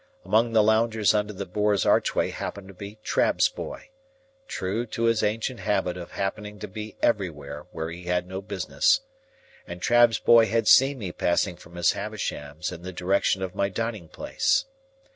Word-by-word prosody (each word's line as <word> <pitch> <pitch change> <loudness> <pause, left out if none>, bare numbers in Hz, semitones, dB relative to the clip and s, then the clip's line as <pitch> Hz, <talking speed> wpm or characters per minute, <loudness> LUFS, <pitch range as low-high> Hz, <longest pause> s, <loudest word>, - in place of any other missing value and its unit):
Among 115 +2 +2
the 110 -1 +5
loungers 110 -1 +3
under 105 0 0
the 100 -1 -6
Boar's 105 +2 +1
archway - - +2
happened 100 -1 -6
to - - -11
be 100 +3 -9
Trabb's - - +2
Boy,—true 270 - -7
to 115 - -4
his 115 -1 +3
ancient 110 +3 -1
habit 95 -3 0
of 90 -1 -9
happening 105 +1 -4
to 105 - -7
be 105 +2 -8
everywhere 75 -9 -1
where 80 +1 -4
he 85 +1 -9
had 90 0 0
no 95 +1 -6
business,—and 265 - -2
Trabb's 120 +2 +4
boy 115 -1 +6
had 115 -1 0
seen 135 +1 +6
me 100 -7 -5
passing 85 +1 0
from 85 0 -16
Miss 85 -1 +3
Havisham's 90 -7 -4
in 90 -1 -8
the 90 +1 -6
direction 95 +1 +1
of 90 -1 -4
my 100 0 0
dining 110 -3 -4
place. 295 - 0
105 Hz, 165 wpm, -26 LUFS, 90-115 Hz, -, boy